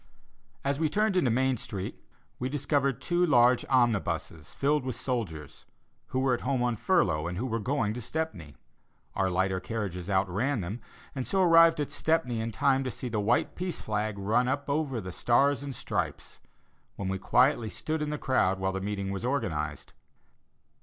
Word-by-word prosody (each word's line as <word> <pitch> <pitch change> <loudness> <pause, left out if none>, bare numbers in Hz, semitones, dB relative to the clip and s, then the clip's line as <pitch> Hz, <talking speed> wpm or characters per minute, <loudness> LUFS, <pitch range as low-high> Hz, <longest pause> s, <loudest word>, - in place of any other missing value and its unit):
As 140 +1 0
we 160 -1 +2
turned 210 +2 +1
into 160 -9 +3
Main 130 +2 +2
Street, 100 -3 -6 0.4
we 125 - -2
discovered 140 -1 0
two 175 0 +1
large 125 -6 +5
omnibuses 100 - 0
filled 145 0 +1
with 130 -2 -3
soldiers, 85 - -4 0.4
who - - -4
were 130 0 +2
at 120 - -1
home 130 -1 0
on 120 -1 +1
furlough, 105 - +1
and 90 +1 -4
who 120 - -2
were 115 -2 -1
going 115 -2 0
to 120 - -6
Stepney. 110 - -4 0.6
Our 95 -1 +1
lighter 95 +1 0
carriages 95 -2 -4
outran 100 +7 +1
them, 100 +7 -5 0.3
and 130 -2 -4
so 190 -1 +2
arrived 165 -2 +6
at 145 - -2
Stepney 155 -8 0
in 115 +1 -3
time 135 +6 +2
to 130 - -2
see 125 0 -5
the 110 -2 -1
white 110 +4 +1
peace 180 -1 -4
flag 105 -1 -2
run 110 +6 +1
up 140 +2 -1
over 140 -5 -1
the 95 -1 -6
stars 135 +8 +2
and 140 -2 -6
stripes, - - -4 0.6
when 100 - -4
we 95 0 -2
quietly 125 +1 +3
stood 155 +6 -3
in 150 - -1
the 150 - -2
crowd 95 -10 +1
while 95 0 -1
the 95 - -3
meeting 100 -1 -3
was 100 +2 -4
organized. 90 - -2
120 Hz, 180 wpm, -29 LUFS, 100-140 Hz, 0.6 s, arrived